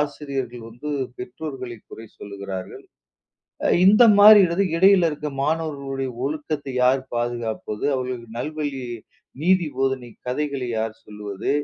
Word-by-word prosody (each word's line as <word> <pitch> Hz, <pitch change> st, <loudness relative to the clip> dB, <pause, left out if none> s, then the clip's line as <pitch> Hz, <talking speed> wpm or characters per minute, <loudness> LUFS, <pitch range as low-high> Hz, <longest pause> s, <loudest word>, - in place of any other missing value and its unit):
ஆசிரியர்கள் 135 Hz, -5 st, -4 dB
வந்து 120 Hz, +6 st, -8 dB, 0.3 s
பெற்றோர்களை 130 Hz, -1 st, -7 dB
குறை 110 Hz, 0 st, -10 dB
சொல்கிறார்கள். 100 Hz, -2 st, -7 dB, 1.0 s
இந்த 210 Hz, +5 st, +7 dB, 0.2 s
மாரி 210 Hz, +1 st, +10 dB
இடது 170 Hz, +4 st, +1 dB
இடையில் 190 Hz, 0 st, +6 dB
இருக்க 150 Hz, -1 st, -4 dB
மாணவர்களின் 140 Hz, -5 st, -2 dB
ஒழுக்கத்தை 145 Hz, -1 st, -3 dB
யார் 130 Hz, +1 st, +3 dB
பாதுகாப்பது? 120 Hz, -3 st, -3 dB
அவர்களுக்கு 125 Hz, -3 st, -4 dB
நல்வழி 145 Hz, -1 st, -3 dB, 0.6 s
நீதி 180 Hz, -1 st, +3 dB
போதனை 135 Hz, -2 st, -1 dB, 0.2 s
கதைகளை 140 Hz, -1 st, -2 dB
யார் 110 Hz, 0 st, -2 dB
சொல்வது? 105 Hz, -1 st, -5 dB
135 Hz, 110 wpm, -23 LUFS, 120-150 Hz, 1.0 s, மாரி